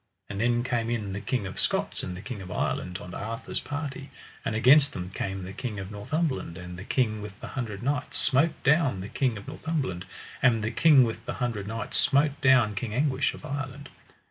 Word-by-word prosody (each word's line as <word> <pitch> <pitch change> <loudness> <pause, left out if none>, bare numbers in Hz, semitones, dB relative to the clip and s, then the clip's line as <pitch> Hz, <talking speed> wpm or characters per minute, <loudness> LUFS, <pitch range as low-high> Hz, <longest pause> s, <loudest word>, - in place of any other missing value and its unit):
And 100 0 -3
then 120 0 +2
came 120 -2 0
in 105 -5 -2
the 100 - -4
King 125 -6 -1
of 95 - -5
Scots - - 0
and 90 -1 -5
the 95 - -9
King 105 -1 -6
of 90 - -8
Ireland 90 0 -1
on 90 -1 -9
Arthur's 115 +5 -3
party, 145 -1 -5 0.3
and 110 - -1
against 140 +6 +6
them 90 0 -5
came 95 0 -3
the 95 +1 -7
King 115 -2 -4
of 95 0 -6
Northumberland, 130 - -2
and 90 -1 -7
the 90 - -7
King 110 -2 +1
with 105 -1 -8
the - - -7
Hundred 110 -5 -4
Knights 145 +2 -1
smote 150 +3 +2
down 140 - +3
the 100 - -6
King 125 -5 0
of 100 - -10
Northumberland, 140 - -2 0.4
and 115 -4 +4
the 110 - 0
King 150 -4 +7
with 115 -2 -2
the - - -1
Hundred 115 -6 -2
Knights 115 +1 -2
smote 145 0 +3
down 130 -5 +5
King 105 +2 -3
Anguish 135 0 +1
of - - -11
Ireland. 140 -1 -5
120 Hz, 210 wpm, -28 LUFS, 100-140 Hz, 0.4 s, King